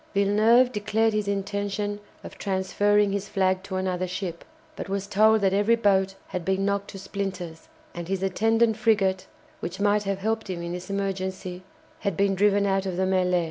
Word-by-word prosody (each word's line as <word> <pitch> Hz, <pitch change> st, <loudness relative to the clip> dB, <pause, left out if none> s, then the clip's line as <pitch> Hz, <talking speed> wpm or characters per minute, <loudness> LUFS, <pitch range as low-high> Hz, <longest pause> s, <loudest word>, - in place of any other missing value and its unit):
Villeneuve 215 Hz, +5 st, +4 dB
declared 215 Hz, +1 st, +1 dB
his 210 Hz, -1 st, -1 dB
intention 200 Hz, +1 st, -2 dB, 0.2 s
of -, -, -9 dB
transferring 205 Hz, +1 st, +1 dB
his 200 Hz, 0 st, -3 dB
flag 185 Hz, -1 st, +1 dB
to 190 Hz, 0 st, -6 dB
another 185 Hz, -1 st, -1 dB
ship, 180 Hz, -2 st, -5 dB, 0.3 s
but -, -, -6 dB
was 195 Hz, 0 st, -2 dB
told 215 Hz, +2 st, +4 dB
that 195 Hz, -1 st, +2 dB
every 205 Hz, +4 st, +3 dB
boat 195 Hz, -4 st, +2 dB
had 180 Hz, -, -4 dB
been 190 Hz, +2 st, 0 dB
knocked 200 Hz, 0 st, -1 dB
to -, -, -8 dB
splinters, 190 Hz, -4 st, -5 dB, 0.3 s
and 170 Hz, -1 st, -6 dB
his 190 Hz, 0 st, -2 dB
attendant 225 Hz, +3 st, +2 dB
frigate, 190 Hz, -4 st, +1 dB, 0.3 s
which 175 Hz, +3 st, -5 dB
might 205 Hz, +1 st, +3 dB
have 195 Hz, -1 st, -1 dB
helped 220 Hz, +1 st, -2 dB
him 175 Hz, -2 st, -4 dB
in 170 Hz, -, -4 dB
this 180 Hz, +2 st, -6 dB
emergency, 190 Hz, -2 st, -3 dB, 0.4 s
had 200 Hz, -5 st, -2 dB
been 200 Hz, 0 st, +2 dB
driven 200 Hz, +1 st, +3 dB
out 195 Hz, -1 st, 0 dB
of 180 Hz, -2 st, -3 dB
the 190 Hz, -, +1 dB
mêlée. 180 Hz, -1 st, +2 dB
195 Hz, 180 wpm, -25 LUFS, 190-205 Hz, 0.4 s, Villeneuve